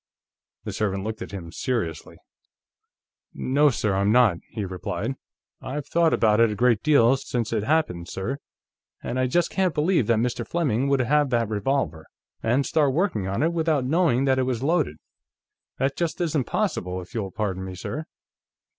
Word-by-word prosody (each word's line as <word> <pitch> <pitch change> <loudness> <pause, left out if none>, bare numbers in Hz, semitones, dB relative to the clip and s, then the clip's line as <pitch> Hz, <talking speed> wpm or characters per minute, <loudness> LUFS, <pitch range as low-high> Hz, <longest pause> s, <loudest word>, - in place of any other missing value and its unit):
The - - -5
servant 100 -2 -1
looked 110 +1 -5
at - - -5
him 90 -4 -7
seriously. 85 -8 -3 1.2
"No, 145 +3 +3
sir; 110 -6 0
I'm 100 +2 +2
not," 120 -7 +5
he 105 -3 -4
replied. 90 -1 -3 0.5
"I've 140 +2 -4
thought 165 +2 +2
about 110 -1 +3
it 115 -1 +5
a 105 - -3
great 115 0 +3
deal, 135 -5 +5
since 120 -4 -3
it 110 -2 0
happened, 145 - 0
sir, 125 +9 -4 0.6
and 125 - -2
I 130 - +2
just 175 +7 +1
can't 185 -3 0
believe 150 - +2
that 115 - +3
Mr. 120 +2 -1
Fleming 140 -7 0
would 140 -1 +2
have 145 +3 +2
that 115 -3 +1
revolver, 105 - -1 0.3
and 125 +5 +1
start 145 -4 +2
working 165 - 0
on 100 +8 -1
it, 165 +2 +1
without 160 -5 +1
knowing 140 -3 +2
that 130 -1 +2
it - - +2
was 125 -1 -2
loaded. 155 - +1 0.8
That 135 +1 0
just 170 0 -2
isn't 155 -6 0
possible, 95 - -1
if 90 +5 -11
you'll 105 -5 -2
pardon 95 -2 -3
me, 95 -1 -6
sir. 150 - -5
125 Hz, 175 wpm, -25 LUFS, 105-150 Hz, 1.2 s, not